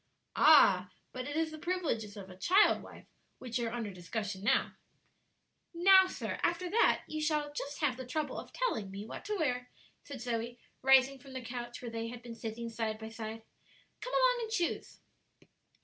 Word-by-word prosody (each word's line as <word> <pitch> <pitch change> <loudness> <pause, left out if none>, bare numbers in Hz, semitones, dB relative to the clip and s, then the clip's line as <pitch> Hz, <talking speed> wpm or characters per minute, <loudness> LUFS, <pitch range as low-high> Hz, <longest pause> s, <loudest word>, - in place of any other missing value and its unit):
"Ah 195 -12 +7
I - - -30 0.2
but 255 0 -5
it 290 - -4
is 320 -1 0
the 310 - -8
privileges 290 - -2
of 195 -2 -8
a - - -11
child 370 - +4
wife - - -13 0.3
which 245 -1 -4
are 230 -1 -1
under 230 -3 -3
discussion 195 +2 -5
now," 220 - +2 1.0
"Now, 380 +2 +7
sir, - - -4
after 345 +1 0
that 460 - +3
you 310 0 -4
shall 300 -1 0
just 285 0 -5
have 255 -4 +1
the 260 - -6
trouble 300 +3 -2
of - - -10
telling 455 - -1
me 200 +2 -7
what - - -8
to 420 +1 -1
wear," 250 -6 -1 0.3
said 280 -3 -8
Zoe, 235 0 -3 0.2
rising 270 0 +5
from 270 0 -13
the 260 -1 -5
couch 240 0 -6
where 235 - -5
they 230 0 -3
had 240 0 -8
been 235 -1 -7
sitting 230 +1 -5
side 225 -1 -3
by 220 0 -8
side; 225 0 -7 0.6
"come - - -6
along - - +4
and 450 - -4
choose." 350 -6 -2
250 Hz, 190 wpm, -32 LUFS, 225-315 Hz, 1.0 s, Ah